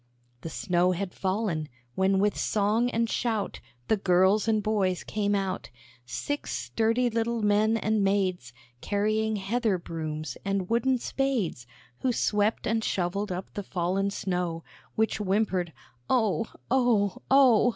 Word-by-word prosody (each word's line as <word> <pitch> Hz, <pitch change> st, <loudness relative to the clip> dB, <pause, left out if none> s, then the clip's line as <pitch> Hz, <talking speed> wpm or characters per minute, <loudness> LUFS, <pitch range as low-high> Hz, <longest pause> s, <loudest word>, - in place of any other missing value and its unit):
The 165 Hz, -, -5 dB
snow 180 Hz, +1 st, +1 dB
had 180 Hz, 0 st, -4 dB
fallen, 185 Hz, -6 st, -1 dB, 0.2 s
when 190 Hz, +3 st, +2 dB
with 205 Hz, +1 st, +2 dB
song 215 Hz, +4 st, +1 dB
and 230 Hz, -1 st, 0 dB
shout 225 Hz, -3 st, -1 dB, 0.3 s
The 220 Hz, -, +3 dB
girls 190 Hz, +3 st, +3 dB
and 215 Hz, -2 st, +2 dB
boys 195 Hz, -4 st, 0 dB
came 205 Hz, -1 st, 0 dB
out; 190 Hz, -11 st, -2 dB, 0.4 s
Six 290 Hz, -, -3 dB
sturdy 230 Hz, +2 st, +1 dB
little 230 Hz, -1 st, -1 dB
men 210 Hz, +2 st, +3 dB
and 215 Hz, -1 st, +1 dB
maids, 185 Hz, -9 st, 0 dB, 0.3 s
Carrying 215 Hz, +2 st, 0 dB
heather 210 Hz, +1 st, 0 dB
brooms, 155 Hz, -2 st, -5 dB
and 195 Hz, 0 st, -2 dB
wooden 250 Hz, +3 st, +3 dB
spades, 240 Hz, -, -1 dB, 0.3 s
Who 255 Hz, -, +1 dB
swept 210 Hz, -2 st, +1 dB
and 225 Hz, 0 st, 0 dB
shovelled 195 Hz, +2 st, -1 dB
up 180 Hz, +1 st, -5 dB
the 205 Hz, -, -3 dB
fallen 190 Hz, +1 st, -1 dB
snow, 180 Hz, -4 st, -2 dB, 0.3 s
Which 220 Hz, 0 st, +1 dB
whimpered, 190 Hz, -4 st, 0 dB, 0.4 s
"Oh! 225 Hz, -2 st, +2 dB, 0.2 s
oh! 235 Hz, -7 st, +2 dB
oh! 255 Hz, -4 st, +6 dB
205 Hz, 135 wpm, -27 LUFS, 185-225 Hz, 0.4 s, oh